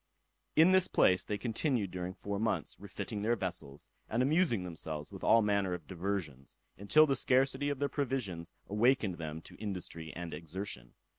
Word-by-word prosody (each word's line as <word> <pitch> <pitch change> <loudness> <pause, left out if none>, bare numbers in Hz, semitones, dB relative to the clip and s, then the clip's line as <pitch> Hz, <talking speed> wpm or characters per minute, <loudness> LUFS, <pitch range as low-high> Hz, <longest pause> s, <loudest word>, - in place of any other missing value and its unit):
In 165 +4 +7
this 185 -1 +6
place 90 0 +4
they 105 - -3
continued 115 - 0
during 90 0 -4
four 100 0 -4
months, 110 -8 -1
refitting 105 - -5
their 115 +3 +2
vessels, 90 -8 -5 0.2
and 115 +3 +1
amusing 145 - +2
themselves 80 -3 -6
with - - -9
all 115 -1 +5
manner 100 -3 +1
of 85 -3 -10
diversions, 90 -7 -4 0.2
until 125 +11 +5
the 140 -3 +1
scarcity 130 +2 +2
of 145 - -2
their 140 +1 0
provisions 115 - -3 0.2
awakened 105 -3 +2
them 80 0 -5
to - - -13
industry 90 -6 -5
and 85 -1 -5
exertion. 85 -7 -6
100 Hz, 165 wpm, -33 LUFS, 85-125 Hz, 0.2 s, In